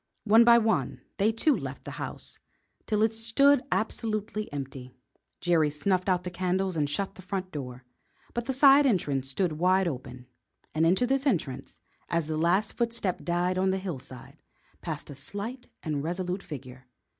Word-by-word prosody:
One 225 +2 +6
by 235 0 +7
one 225 -1 0 0.2
they 210 +2 +3
too 265 +6 +2
left - - -6
the - - -6
house - - -6 0.5
till 215 -1 +2
it 220 0 +2
stood 245 +5 +4
absolutely 215 -1 -2
empty. 135 -3 -7 0.5
Jerry 165 -4 +3
snuffed 185 +6 0
out 180 -1 +2
the 180 - -5
candles 185 +1 -1
and 145 -2 0
shut 195 +6 -2
the - - -12
front 185 0 -4
door, 125 -3 -7 0.5
but 240 0 -2
the - - +1
side 275 +1 +7
entrance 140 - 0
stood 155 +2 -1
wide 185 +1 +3
open, 125 -4 -6 0.5
and 160 +1 +3
into 190 +9 +3
this 270 +3 +1
entrance, 135 - -2 0.3
as 170 -2 0
the 155 0 -3
last 175 +6 +2
footstep 230 -6 -2
died 180 +1 0
out - - +2
on 190 - +2
the 190 - +1
hillside, 135 -9 -8 0.4
passed - - -5
a - - -6
slight 205 - -5 0.2
and 150 -3 -2
resolute 180 +3 -2
figure. 130 -6 -9
185 Hz, 170 wpm, -28 LUFS, 150-220 Hz, 0.5 s, by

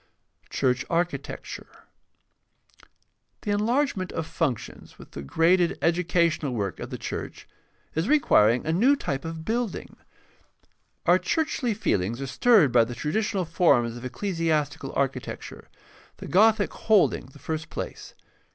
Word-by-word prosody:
4. - - -30
CHURCH 130 -1 0
ARCHITECTURE 170 +1 -4 1.6
The 210 - -2
enlargement 210 -2 0
of 160 - -3
functions, 145 -8 -4
with - - -14
the - - -7
graded 170 - +2
educa 170 0 +2
tional 140 -4 -3
work 100 -5 -3
of - - -6
the - - -5
church, - - -6 0.5
is 160 +8 -1
requiring 120 - +4
a 160 - 0
new 250 +11 +4
type 140 - -3
of 165 0 -6
building. 230 -2 -3 1.1
Our - - +5
churchly 270 -8 -1
feelings 115 - -1
are 135 - -3
stirred 170 - +4
by 120 -1 +5
the 120 +1 -5
traditional 190 - -1
forms 155 -9 +2
of 120 - -9
ecclesiastical 155 -3 -2
architecture, 135 -2 -4 0.5
the - - -9
Gothic 215 +2 +3
holding 210 - +2
the 135 - -16
first 155 +2 -5
place. - - -7
165 Hz, 135 wpm, -26 LUFS, 135-205 Hz, 1.6 s, Our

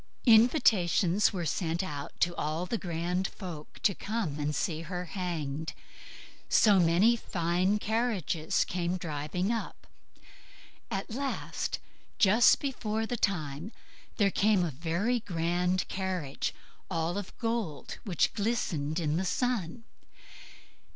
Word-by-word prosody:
Invitations 220 - +5
were 180 -5 -3
sent 165 +1 -1
out 145 -6 -6
to 175 0 +2
all 155 +3 -2
the 230 +4 -2
grand 175 +2 -1
folk 165 -5 -9
to 200 - +4
come 195 -8 -3
and 150 0 -1
see 160 +1 -1
her 180 +2 -4
hanged; 160 -5 -3 0.8
so 205 -3 +6
many 180 +7 +5
fine 180 -1 0
carriages 210 - 0
came 180 0 -1
driving 170 +4 -2
up. 230 -1 -4 1.0
At 195 -1 -3
last, 275 +2 -2 0.4
just 210 +3 +6
before 225 -5 -2
the 245 - -2
time, 170 -3 -1 0.5
there 200 -3 +3
came 200 -3 +3
a 165 - -2
very 170 - 0
grand 180 -1 0
carriage, 185 -7 -2 0.4
all 165 -1 -1
of 200 -2 -6
gold, 225 -10 -3
which 185 -8 +1
glistened 185 -9 -1
in 155 -1 0
the 185 - 0
sun. 230 -1 -1
180 Hz, 120 wpm, -30 LUFS, 165-215 Hz, 1.0 s, so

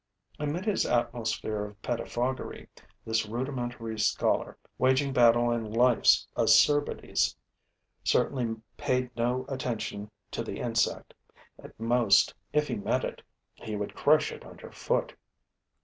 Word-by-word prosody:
Amid 150 +5 -2
his 210 -3 +1
atmosphere 115 -3 -1
of 105 0 -9
pettifoggery, 120 +2 -3 0.4
this 110 -1 0
rudimentary 120 -2 -4
scholar, 110 - +1 0.2
waging 130 +2 +2
battle 120 -1 +5
on 120 -1 0
life's 120 +1 +4
acerbities, 145 -1 +3 0.7
certainly 120 -4 +1 0.2
paid 125 -1 -1
no 125 +2 0
attention 115 -6 -4 0.2
to - - -3
the - - -6
insect; 115 -2 -1 0.5
at - - -14
most, 115 -3 +4 0.2
if 150 0 +1
he 120 - -2
met 100 - 0
it, - - -5 0.3
he 110 - -7
would 105 0 -4
crush 155 - +3
it 460 +1 -10
under - - -12
foot. - - -1
120 Hz, 120 wpm, -28 LUFS, 115-130 Hz, 0.7 s, battle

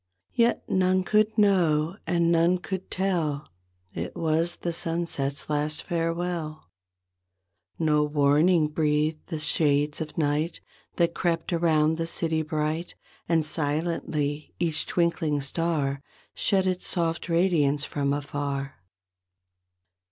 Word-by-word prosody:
Yet 235 0 +1
none 185 0 +2
could 215 +3 +2
know 170 -5 +3
and 170 -1 +2
none 170 +2 +3
could 190 +1 -6
tell 165 -7 -1 0.5
It 85 +2 -5
was 165 +1 0
the 170 - -4
sunset's 165 -5 -1
last 150 +1 -1
farewell. 165 - -3 1.1
No 150 -2 +2
warning 150 +3 +3
breathed 155 0 0
the 165 - -4
shades 150 0 +2
of 150 -1 -6
night 155 +2 0 0.4
That 170 -1 +1
crept 170 0 -1
around 160 -2 +2
the 165 - -1
city 160 -1 0
bright, 155 +2 -3 0.3
And 165 -2 +3
silently 150 -1 -1
each 165 -3 0
twinkling 165 -4 0
star 140 -1 -1 0.3
Shed 190 -2 +2
its 185 -1 0
soft 170 -1 -1
radiance 165 -5 +2
from 140 -1 -1
afar. 140 -1 -3
160 Hz, 115 wpm, -26 LUFS, 150-170 Hz, 1.1 s, know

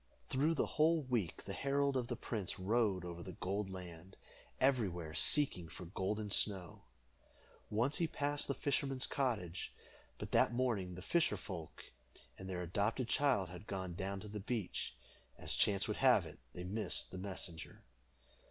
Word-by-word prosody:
Through 150 +5 +2
the - - +2
whole 160 +1 +3
week 120 -10 -1
the 95 - -4
herald 140 +5 +1
of 125 -2 0
the 120 - -2
prince 110 -5 -3
rode 100 -2 +1
over 85 -1 -6
the 90 +1 -7
Gold 95 +3 -2
Land, 90 -1 -9 0.4
everywhere 95 - +1
seeking 90 - +5
for 90 - -8
Golden 100 +4 -2
Snow. 95 -5 +2 0.9
Once 120 +7 +1
he 170 - +2
passed 145 -1 -1
the 140 - -1
fisherman's 135 -2 +1
cottage, 105 - -2 0.4
but - - -6
that - - +4
morning 115 -8 0
the 90 - -8
fisher 170 - +2
folk 85 -6 -7 0.5
and 95 0 -8
their 90 -1 -2
adopted 105 +7 0
child 130 - +3
had 90 +3 -10
gone 95 -2 -3
down 95 +2 -3
to 105 - -8
the 105 0 -5
beach. 105 -1 -3 0.4
As - - -1
chance 100 -1 +2
would - - -2
have - - +5
it, - - -11
they 90 - -7
missed 100 +1 0
the 95 - -6
messenger. 90 -4 -6
100 Hz, 160 wpm, -37 LUFS, 90-130 Hz, 0.9 s, seeking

